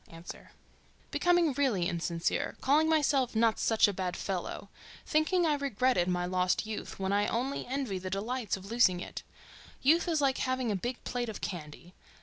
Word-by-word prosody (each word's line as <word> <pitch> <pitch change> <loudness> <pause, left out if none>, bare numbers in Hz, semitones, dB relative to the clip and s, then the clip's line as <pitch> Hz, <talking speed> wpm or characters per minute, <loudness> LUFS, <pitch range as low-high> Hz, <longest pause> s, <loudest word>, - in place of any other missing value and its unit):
A.—Becoming 325 - -2
really 245 -11 +1
insincere—calling 175 - 0
myself 280 -6 +2
"not 225 0 +3
such 225 -1 +4
a 205 - -1
bad 185 -1 -3
fellow," 195 +1 -4 0.4
thinking 335 +3 +2
I 310 - +3
regretted 255 -8 +1
my 180 -1 0
lost 180 +2 +1
youth 215 -1 -6
when 195 0 -1
I 205 +1 +2
only 255 +4 -2
envy 255 -7 -2
the 185 0 -5
delights 215 +2 -2
of 190 - -12
losing 230 -7 +4
it. - - -7 0.6
Youth 325 +6 +4
is 325 -3 +1
like 275 -2 +1
having 255 -3 0
a - - 0
big 240 +6 -4
plate 245 -2 -3
of 215 - -6
candy. 170 -1 -7
225 Hz, 160 wpm, -30 LUFS, 185-275 Hz, 0.6 s, such